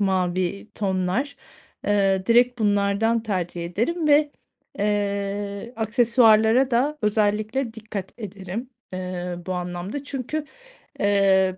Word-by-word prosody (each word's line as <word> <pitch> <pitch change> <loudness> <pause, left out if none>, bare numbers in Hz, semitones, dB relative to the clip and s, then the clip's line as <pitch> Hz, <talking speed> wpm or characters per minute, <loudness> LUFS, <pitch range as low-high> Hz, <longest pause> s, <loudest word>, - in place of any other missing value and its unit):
mavi 185 0 0
tonlar, 190 +7 -1 0.5
eee, 195 -2 +2
direkt 245 +1 +4
bunlardan 205 +2 +2
tercih 180 -5 -3
ederim 300 - -1
ve, 295 0 +5 0.5
eee, 200 +1 -2
aksesuarlara 230 +2 +4
da 280 +6 +1
özellikle 215 +3 0
dikkat 210 -4 -6
ederim, 205 +3 -6 0.2
eee, 180 -1 -4
bu 185 - -2
anlamda. 180 +8 -4
Çünkü, 280 +2 -4 0.6
eee 195 -2 +3
205 Hz, 100 wpm, -24 LUFS, 190-235 Hz, 0.6 s, ve